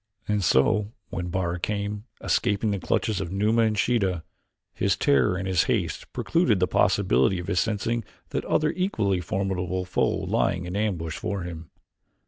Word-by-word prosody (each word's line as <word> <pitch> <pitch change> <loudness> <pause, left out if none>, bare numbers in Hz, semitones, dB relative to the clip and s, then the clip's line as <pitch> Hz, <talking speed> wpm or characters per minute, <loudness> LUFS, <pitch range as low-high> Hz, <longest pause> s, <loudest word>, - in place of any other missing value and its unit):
And 105 -2 +1
so, 100 - +3 0.2
when 90 -2 -3
Bara 90 -1 -1
came, 105 +2 -3 0.2
escaping 105 +2 +1
the 100 - -1
clutches 105 +2 0
of 90 -2 -4
Numa 105 +4 +2
and 110 -2 +2
Sheeta, 95 -6 +1 0.5
his - - +1
terror 70 +3 +3
and 95 +1 -3
his 90 -4 +2
haste - - -2
precluded 165 - +1
the 90 - +4
possibility 65 +1 +2
of 90 - -5
his 95 -1 0
sensing 115 +2 0 0.3
that - - -2
other 155 0 +2
equally 110 - 0
formidable 90 0 -2
foe 90 - +1
lying 90 0 0
in 90 +2 -5
ambush 90 -7 -1
for 100 -4 -3
him. 85 -2 -7
95 Hz, 160 wpm, -26 LUFS, 90-105 Hz, 0.5 s, the